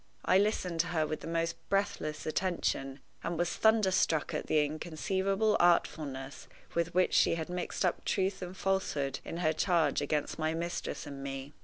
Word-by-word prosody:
I 185 - +5
listened 185 -5 0
to 165 - +3
her 160 -3 +1
with 155 0 -3
the - - -8
most 165 0 -1
breathless 195 -6 -1
attention, 155 -5 -1 0.2
and 170 0 -2
was 175 +1 0
thunderstruck 190 -7 +3
at - - -3
the 150 -1 +3
inconceivable 190 +7 0
artfulness 145 -6 +1 0.3
with 170 0 -1
which 185 0 +3
she - - +4
had 160 0 -4
mixed 180 +1 -2
up 180 - 0
truth 190 0 0
and 180 +1 -6
falsehood 150 -8 0
in 165 - -6
her 155 - +4
charge 160 -3 +2
against 150 +2 -1
my 155 0 0
mistress 170 +1 -3
and 140 -1 -7
me. 135 +1 -6
170 Hz, 170 wpm, -31 LUFS, 155-185 Hz, 0.3 s, I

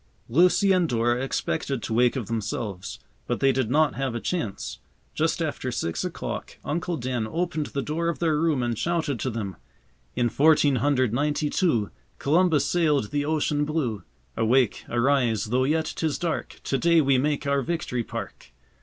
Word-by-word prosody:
Lucy 180 - +4
and 180 -3 +3
Dora 120 +1 +1
expected 135 -1 -2
to 110 - -3
wake 120 +3 +3
of 125 -5 -2
themselves, 100 - -4 0.3
but - - -1
they 135 0 +4
did 130 -4 0
not 150 +1 +3
have 135 -3 -2
a - - -1
chance. 140 - -3 0.3
Just - - 0
after - - -3
six 85 - -2
o'clock - - -5
Uncle 170 +2 -2
Dan 120 -3 -2
opened 165 -1 -2
the 140 - -3
door 165 +3 -1
of 170 - -2
their 160 -3 +1
room 155 -6 +1
and 120 -1 -1
shouted 160 -2 -1
to 130 - -1
them: 110 -5 -4 0.6
"In 120 -1 +2
fourteen 145 +1 +4
hundred 130 -2 +1
ninety 150 +3 0
two 120 - +1 0.3
Columbus 160 +1 +3
sailed 150 -10 +1
the 145 0 0
ocean 150 -1 +1
blue. 145 -9 -1 0.3
Awake, 120 +1 +2
arise! 120 -3 +2
though 125 +4 +1
yet 155 +3 0
'tis 160 -3 -1
dark, 170 -2 -3
To 135 - -1
day 170 -1 +4
we 135 -3 +3
make 145 +1 0
our 140 0 +2
Victory 125 -4 -2
Park." - - -8
140 Hz, 170 wpm, -25 LUFS, 120-160 Hz, 0.6 s, Lucy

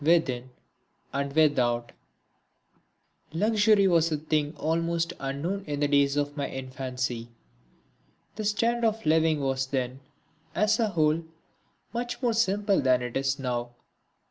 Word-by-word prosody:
(3) 165 +3 +6
Within 130 -6 -2 0.6
and 140 0 -2
Without 120 -6 +2 1.4
Luxury 210 +2 +4
was 165 -2 +3
a 155 - +1
thing 150 0 -1
almost 165 +1 0
unknown 155 +9 -3
in 145 -1 -3
the 145 - +2
days 140 0 +3
of 145 0 -1
my 140 -2 -2
infancy. 130 -3 -4 1.1
The 215 - -4
standard 230 +3 +1
of 220 0 -3
living 160 -1 +3
was 135 -1 0
then, 130 -1 -2 0.6
as 215 +1 +2
a 225 - +3
whole, 160 -2 +2 0.7
much 240 +1 -3
more 245 -3 +1
simple 205 -2 +2
than 130 -1 +3
it 125 -1 -5
is 135 0 0
now. 120 -3 -3
150 Hz, 135 wpm, -27 LUFS, 135-195 Hz, 1.4 s, 3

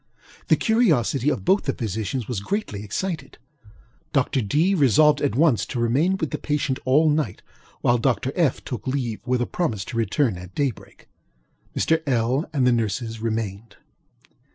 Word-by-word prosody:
The - - +5
curiosity 150 - +2
of 150 - -2
both 190 +3 +3
the 135 - 0
physicians 110 +2 -3
was 120 -6 -2
greatly 105 - -3
excited. 165 - -4 0.8
Dr. 135 -1 +1
DŌĆöŌĆö 160 - +1
resolved 145 +3 +5
at 140 -5 0
once 145 -4 +3
to 120 - -4
remain 140 +11 +2
with 160 -5 -3
the - - -3
patient 145 -3 -1
all 145 +5 +4
night, 150 - 0 0.4
while 120 0 +3
Dr. 130 +1 0
FŌĆöŌĆö 155 -4 0
took 125 -1 -6
leave 130 -5 -2
with 125 -1 +1
a - - -1
promise 115 - -2
to 115 - -6
return 115 -2 +1
at 90 0 -11
daybreak. 140 -6 -4 0.7
Mr. 160 0 +2
LŌĆöl 130 +2 0
and 135 -4 +1
the 125 - +5
nurses 115 0 -1
remained. 110 -2 -3
130 Hz, 160 wpm, -23 LUFS, 115-150 Hz, 0.8 s, The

